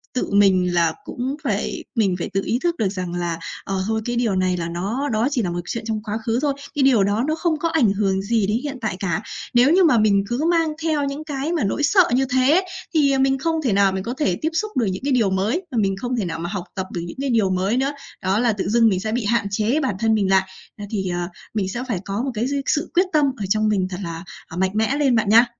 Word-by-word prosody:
tự 250 - -1
mình 185 -3 +4
là 165 -2 +2
cũng 260 +3 -3
phải 210 -5 -2
mình 200 -6 +2
phải 170 - -3
tự 195 - +1
ý 240 - 0
thức 345 -1 +1
được 215 - +1
rằng 185 -3 -4
là, 170 -2 -2 0.2
ờ, 195 -1 -2
thôi 220 0 0
cái 240 - -2
điều 235 -5 +1
này 185 -1 +1
là 170 -1 -3
nó 205 +12 -2
đó 220 +2 +1
chỉ 255 -4 +1
là 180 - -1
một 175 - -3
chuyện 230 - -4
trong 215 -1 -2
quá 215 0 -3
khứ 230 0 +1
thôi, 290 -2 +1 0.2
cái 285 - +2
điều 250 -7 +5
đó 205 +4 +1
nó 310 - +1
không 325 -2 0
có 335 - 0
ảnh 255 -12 +3
hưởng 195 -2 0
gì 210 0 +1
đến 210 +2 +1
hiện 285 -2 -4
tại 215 -5 -2
cả. 195 +1 -1 0.3
Nếu 245 +4 +5
như 375 - +5
mà 290 -8 +5
mình 205 -2 +3
cứ 245 +7 -1
mang 330 -2 +2
theo 310 -3 +1
những 280 +2 -4
cái 290 0 -3
mà 335 - 0
nỗi 205 +9 -1
sợ 370 +6 +5
như 265 +1 +2
thế, 260 +8 +4 0.3
thì, 290 -3 +4
ờ, 270 - +1
mình 270 0 +3
không 320 +3 -1
thể 245 -8 +1
nào 195 -1 +4
mình 190 0 -3
có 235 +4 -3
thể 190 - +1
tiếp 315 - +1
xúc 430 +5 -2
được 235 - +2
những 185 +3 -3
cái 280 - 0
điều 225 -6 +3
mới, 205 - 0
mà 245 - -3
mình 195 -1 0
không 245 +4 -3
thể 220 -5 -1
nào 165 -1 -4
mà 175 +1 -4
học 195 -3 -4
tập 190 -1 -3
được 175 - -3
những 170 +8 -8
cái 275 - -1
điều 220 -5 +2
mới 190 +5 0
nữa. 270 +2 +1 0.3
Đó 190 +3 +1
là 235 -2 +2
tự 200 - -3
dưng 230 +1 +4
mình 185 -3 0
sẽ 215 +2 -3
bị 235 -1 -1
hạn 230 -1 +1
chế 220 +8 +1
bản 260 -9 -1
thân 225 -1 +2
mình 200 -3 +1
lại. 190 0 +3 0.3
Nên 205 -1 -7
thì, 190 -3 -2
à, 175 0 -2 0.2
mình 200 -4 -1
sẽ 240 +5 -4
phải 205 -7 -1
có 200 +3 -2
một 270 - -2
cái 230 +2 -1
dư 280 0 -1
sự 300 +3 0
quyết 365 +2 +4
tâm 300 -2 +4
ở 205 - -3
trong 215 +1 +2
mình 190 -3 +1
thật 180 - -5
là, 165 0 -5 0.2
à, 165 - -9
mạnh 190 +1 +1
mẽ 220 +5 +1
lên 275 -4 +3
bạn 220 -3 +1
nha. 230 +3 +7
220 Hz, 290 wpm, -22 LUFS, 195-270 Hz, 0.3 s, nha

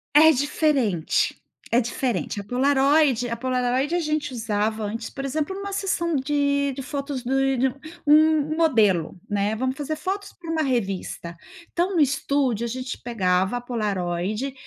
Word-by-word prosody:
É 315 +1 +8
diferente, 270 - +1 0.3
é 235 - +4
diferente. 240 -3 -2
A - - -8
Polaroid 270 +1 +3
a 235 - -2
Polaroid 255 +4 0
a 350 - +2
gente 305 -3 -1
usava 220 -2 -1
antes, 225 +2 -4
por 275 - -7
exemplo, 300 +6 -2
numa 400 +1 -5
sessão 340 -4 0
de 280 0 +1
de 270 - -5
fotos 280 -1 -4
de 270 +2 +1
de 260 +2 +2
um 250 - -7 0.3
um 310 0 +5
um - - -1
modelo, 215 - +2
né. 205 +1 0
Vamos 260 +3 -2
fazer 295 +2 -3
fotos 385 +5 -4
pra 335 -2 -9
uma 320 -1 +1
revista. 195 - -2 0.4
Então, 360 +3 0
no 335 - +2
estúdio, 275 -4 +1
a - - -2
gente 255 +1 -5
pegava 190 -3 +1
a - - -8
Polaroid 210 0 -2
265 Hz, 165 wpm, -24 LUFS, 225-295 Hz, 0.4 s, É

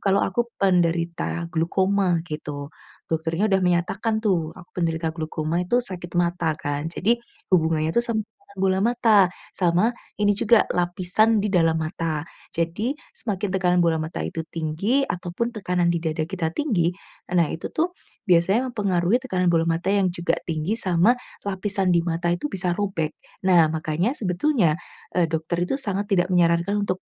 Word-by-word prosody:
kalau 195 0 +3
aku 235 +5 -1
penderita 170 -2 +1
glaukoma 185 +2 +2
gitu. 150 -2 -6 0.4
Dokternya 165 +6 0
udah 190 0 +3
menyatakan 185 +5 0
tuh, 165 -5 +1
aku 180 -1 -14
penderita 165 -2 0
glaukoma 160 +1 -2
itu 245 +6 +2
sakit 180 -4 -7
mata 175 -2 +1
kan 145 +1 -3
jadi, 225 +8 +1 0.3
hubungannya 160 -2 +3
itu 235 - +3
sama 230 -2 0 0.4
bola 190 0 +2
mata, 220 -5 +4 0.2
sama 180 +6 +2 0.2
ini 205 0 +3
juga, 215 +2 +4
lapisan 180 +5 +2
di 205 - 0
dalam 165 -2 +3
mata. 160 -1 -3 0.2
Jadi, 170 +8 -1 0.2
semakin 205 -3 -2
tekanan 180 -1 +2
bola 170 -2 +3
mata 160 +1 -4
itu 165 - -4
tinggi 185 - 0
ataupun 180 +7 -3
tekanan 180 -4 0
di 170 -1 +1
dada 160 -1 -1
kita 170 -3 -2
tinggi, 180 - +1 0.4
nah 175 -2 +3
itu 160 - -5
tuh, 345 +3 -1 0.3
biasanya 190 +7 +3
mempengaruhi 200 +2 +1
tekanan 185 -8 -1
bola 170 -1 +4
mata 165 +2 -2
yang 195 -2 +2
juga 175 0 0 0.2
tinggi 160 +6 -1
sama, 190 +1 +3 0.3
lapisan 195 -1 0
di 170 - +3
mata 170 0 -2
itu 295 +12 -4
bisa 180 -2 -1
robek. 190 -6 -2 0.3
Nah, 170 -4 +5
makanya 160 - -1
sebetulnya, 180 - +2 0.4
eee, 170 -3 +2
dokter 165 +2 -1
itu 270 +10 -1
sangat 205 -4 -2
tidak 180 -3 +3
menyarankan 180 +3 +2
untuk, 185 -2 -1
180 Hz, 155 wpm, -24 LUFS, 165-200 Hz, 0.4 s, Nah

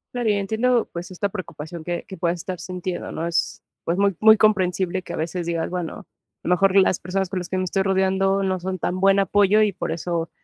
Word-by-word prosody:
Claro, 240 -3 0
y - - +4
entiendo, 220 +5 +1
pues, 175 +3 -6
esta 185 +3 -1
preocupación 170 -4 -7
que 175 +1 -4
que 190 - -8
puedas 175 -2 -1
estar 185 +2 -5
sintiendo, 180 +1 -5
¿no? 165 +1 -3
Es, 170 - -1 0.2
pues, 170 +2 -1
muy 200 -1 +2
muy 220 0 +8
comprensible 190 -3 +2
que - - -10
a - - -4
veces 170 +2 -3
digas, 165 -1 -2
bueno, 180 +3 -5 0.3
lo - - -4
mejor 190 +1 +4
las 185 -2 +4
personas 190 +2 -1
con 190 -1 -2
las 180 - -7
que 190 - -1
me 185 - 0
estoy 190 +1 0
rodeando 195 0 +2
no 190 -2 -1
son 185 +1 -3
tan 185 +3 -2
buen 195 0 +5
apoyo 205 +1 +4
y 210 -2 +2
por 190 - -4
eso 170 0 -2
185 Hz, 230 wpm, -23 LUFS, 175-195 Hz, 0.3 s, muy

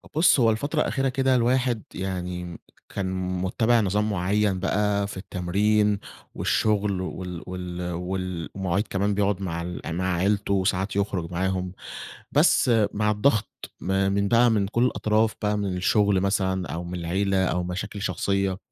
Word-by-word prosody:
بُصّ 160 -2 +5
هو 115 -2 +5
الفترة 145 +8 -1
الأخيرة 135 -2 0
كده 130 0 +2
الواحد 125 -2 +1
يعني 90 -2 -4 0.3
كان 95 -1 -3 0.3
مُتَّبِع 110 +5 +2
نظام 105 +2 +1
معيّن 100 0 +1
بقى 100 +1 +1
في 100 - -8
التمرين 100 +3 +1 0.4
والشغل 105 -3 +1
وال 90 -2 -5
وال 90 -1 -5
والمواعيد 90 +2 -3
كمان 100 +1 0
بيقعد 100 -1 0
مع 85 -3 -3
ال 90 +1 -5
مع 90 +1 0
عيلته 100 +3 +1
وساعات 95 +1 0
يخرج 95 -4 -1
معاهم 95 +1 -1 0.6
بس 125 - +4 0.2
مع 105 +1 +1
الضغط 105 +1 +2 0.3
م - - -7 0.2
من 100 0 +1
بقى 120 +2 +5
من 100 -3 +1
كل 115 +4 +1
الأطراف 110 -2 +1
بقى 105 -1 +1
من 100 -3 -2
الشغل 100 +1 +3
مثلًا 95 -2 0
أو 85 +1 -4
من 90 +1 -5
العيلة 95 +3 +1
أو 90 0 0
مشاكل 95 +3 -5
شخصيّة 95 +1 0
100 Hz, 150 wpm, -25 LUFS, 90-105 Hz, 0.6 s, بُصّ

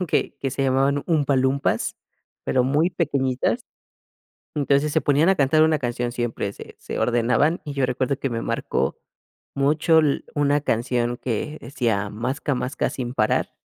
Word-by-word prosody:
¿no?, 180 - -1
que - - 0
que 135 - -1
se 135 +2 -2
llamaban 135 +2 +2
Umpa 145 -5 +2
Lumpas, 130 +2 0 0.5
pero 125 -1 +2
muy 150 +7 +2
pequeñitas. 140 - 0 0.9
Entonces, 140 +1 +2
se - - +2
ponían 145 +5 +3
a 190 - +4
cantar 155 0 +4
una 160 -1 +3
canción 120 -1 -2
siempre, 120 -4 -2
se - - -11
se - - -5
ordenaban, 125 +7 +2
y 145 - -5
yo 135 -2 +1
recuerdo 130 +2 -1
que 135 - -1
me 115 -1 -3
marcó 65 - -1 0.6
mucho 155 +4 +3
l 145 -3 +1
una 145 0 +2
canción 120 -1 0
que 130 +6 -3
decía: 115 -5 -1
"Masca 130 +5 -2
masca 125 +3 -1
sin 125 -2 -5
parar", 110 -4 +1
135 Hz, 165 wpm, -23 LUFS, 125-145 Hz, 0.9 s, a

